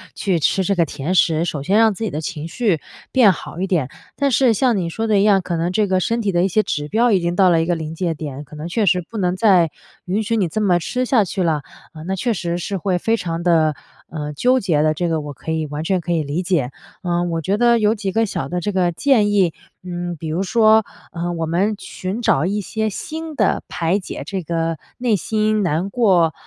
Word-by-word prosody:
去 185 Hz, -4 st, 0 dB
吃 190 Hz, +5 st, +1 dB
这 200 Hz, -, +1 dB
个 170 Hz, -2 st, +3 dB
甜 150 Hz, +5 st, -3 dB
食， 165 Hz, -2 st, +3 dB
首 150 Hz, -5 st, -3 dB
先 195 Hz, +8 st, +2 dB
让 225 Hz, -2 st, +5 dB
自 225 Hz, -, -6 dB
己 220 Hz, -, -1 dB
的 150 Hz, -, -4 dB
情 160 Hz, -1 st, -5 dB
绪 195 Hz, -5 st, 0 dB, 0.3 s
变 240 Hz, -7 st, +6 dB
好 175 Hz, 0 st, -7 dB
一 -, -, +1 dB
点。 160 Hz, -9 st, 0 dB, 0.3 s
但 280 Hz, -1 st, +1 dB
是 245 Hz, -1 st, +4 dB
像 245 Hz, +1 st, +2 dB
你 180 Hz, -4 st, -1 dB
说 225 Hz, +7 st, -3 dB
的 215 Hz, -2 st, +3 dB
一 -, -, +3 dB
样， 200 Hz, -2 st, +4 dB
可 175 Hz, -1 st, -3 dB
能 170 Hz, +2 st, -1 dB
这 210 Hz, +2 st, +1 dB
个 185 Hz, 0 st, +1 dB
身 230 Hz, +5 st, 0 dB
体 200 Hz, -3 st, -1 dB
的 175 Hz, +1 st, +2 dB
一 -, -, +3 dB
些 215 Hz, -, +3 dB
指 150 Hz, -7 st, -3 dB
标 230 Hz, +3 st, +3 dB
已 190 Hz, -, +3 dB
经 170 Hz, +1 st, -2 dB
到 190 Hz, -2 st, +5 dB
了 165 Hz, -1 st, +3 dB
一 -, -, 0 dB
个 175 Hz, -, +1 dB
临 160 Hz, -1 st, -5 dB
界 170 Hz, -1 st, -1 dB
点， 145 Hz, -2 st, -6 dB
可 150 Hz, +2 st, -13 dB
能 155 Hz, +2 st, -5 dB
确 210 Hz, +5 st, 0 dB
实 180 Hz, -1 st, +3 dB
不 230 Hz, -, -7 dB
能 180 Hz, -3 st, +1 dB
再 185 Hz, -6 st, +4 dB, 0.3 s
允 195 Hz, +4 st, 0 dB
许 230 Hz, +2 st, -1 dB
你 190 Hz, -7 st, +1 dB
这 215 Hz, -, -2 dB
么 190 Hz, -5 st, +3 dB
吃 250 Hz, +9 st, -2 dB
下 245 Hz, -4 st, +3 dB
去 190 Hz, +1 st, -3 dB
了。 160 Hz, -4 st, +1 dB, 0.3 s
呃， 155 Hz, -, -9 dB
那 190 Hz, +3 st, -3 dB
确 240 Hz, +4 st, 0 dB
实 175 Hz, -3 st, -2 dB
是 185 Hz, +3 st, -4 dB
会 185 Hz, 0 st, 0 dB
非 225 Hz, +6 st, +1 dB
常 170 Hz, -3 st, -4 dB
得， 160 Hz, -3 st, +3 dB, 0.4 s
呃， 150 Hz, -2 st, -5 dB
纠 250 Hz, -, +2 dB
结 165 Hz, -9 st, +1 dB
的， 155 Hz, 0 st, +2 dB
这 175 Hz, +3 st, -2 dB
个 160 Hz, -2 st, 0 dB
我 145 Hz, -1 st, -7 dB
可 160 Hz, -, -6 dB
以 160 Hz, -1 st, -1 dB
完 150 Hz, +1 st, -5 dB
全 185 Hz, +2 st, 0 dB
可 175 Hz, -, -4 dB
以 165 Hz, -2 st, +1 dB
理 145 Hz, +5 st, -2 dB
解。 170 Hz, -9 st, 0 dB, 0.3 s
嗯， 175 Hz, 0 st, 0 dB
我 165 Hz, -, -1 dB
觉 195 Hz, +5 st, 0 dB
得 235 Hz, 0 st, +4 dB
有 215 Hz, 0 st, +3 dB
几 200 Hz, -3 st, -3 dB
个 225 Hz, +3 st, +2 dB
小 135 Hz, -9 st, -4 dB
的 180 Hz, -, -2 dB
这 205 Hz, +4 st, -2 dB
个 185 Hz, -3 st, +1 dB
建 210 Hz, +1 st, +2 dB
议， 190 Hz, -5 st, +3 dB, 0.3 s
嗯， 175 Hz, -1 st, -4 dB
比 160 Hz, -, -6 dB
如 160 Hz, +4 st, -1 dB
说， 220 Hz, +1 st, +4 dB, 0.3 s
呃， 175 Hz, -1 st, -3 dB
我 165 Hz, -1 st, -2 dB
们 185 Hz, +7 st, 0 dB
寻 190 Hz, +5 st, -5 dB
找 200 Hz, -, +2 dB
一 200 Hz, +3 st, -1 dB
些 220 Hz, +2 st, -2 dB
新 315 Hz, -, -6 dB
的 -, -, +1 dB
排 180 Hz, +3 st, 0 dB
解 185 Hz, -, -7 dB
这 190 Hz, +3 st, -3 dB
个 165 Hz, 0 st, -2 dB, 0.2 s
内 240 Hz, -3 st, +1 dB
心 215 Hz, +2 st, 0 dB
难 175 Hz, +2 st, 0 dB
过， 185 Hz, -8 st, +3 dB
180 Hz, 270 characters per minute, -20 LUFS, 165-210 Hz, 0.4 s, 变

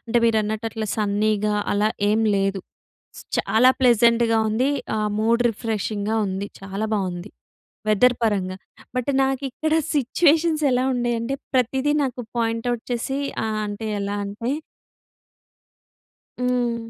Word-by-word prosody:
అంటే, 240 Hz, +1 st, +1 dB
మీరన్నట్టు 220 Hz, 0 st, +1 dB
అట్ల 220 Hz, -1 st, -4 dB
సన్నీగా 210 Hz, 0 st, +1 dB, 0.2 s
అలా 205 Hz, +1 st, +2 dB, 0.2 s
ఏం 215 Hz, +2 st, +2 dB, 0.2 s
లేదు. 195 Hz, 0 st, 0 dB, 0.8 s
చాలా 245 Hz, +4 st, +4 dB
ప్లెజెంట్‍గా 235 Hz, -1 st, +4 dB
ఉంది. 250 Hz, +6 st, +1 dB, 0.3 s
ఆహ్, 210 Hz, -1 st, 0 dB
మూడ్ 230 Hz, +2 st, +3 dB
రిఫ్రెషింగ్‌గా 215 Hz, -1 st, -2 dB
ఉంది. 195 Hz, +1 st, -3 dB
చాలా 195 Hz, +3 st, -3 dB
బావుంది, 185 Hz, -1 st, -3 dB, 0.6 s
వెదర్ 245 Hz, +4 st, +4 dB
పరంగా, 190 Hz, -4 st, 0 dB, 0.4 s
బట్, 250 Hz, +2 st, -1 dB
నాకిక్కడ 270 Hz, +3 st, -1 dB, 0.2 s
సిచ్యుయేషన్స్ 310 Hz, +3 st, +2 dB
ఎలా 255 Hz, +1 st, +2 dB
ఉండేయంటే, 240 Hz, +1 st, -1 dB, 0.2 s
ప్రతిదీ 265 Hz, +4 st, +2 dB
నాకు 255 Hz, -2 st, -3 dB, 0.2 s
పాయింట్ 230 Hz, +1 st, -1 dB
అవుట్ 240 Hz, -2 st, -4 dB
చేసీ 255 Hz, +3 st, -2 dB, 0.3 s
ఆహ్, 215 Hz, -1 st, -2 dB
అంటే, 205 Hz, +2 st, -5 dB
ఎలా 200 Hz, +1 st, -2 dB
అంటే 210 Hz, +5 st, -3 dB, 1.9 s
హ్మ్. 240 Hz, -2 st, -1 dB
225 Hz, 115 wpm, -23 LUFS, 210-250 Hz, 1.9 s, చాలా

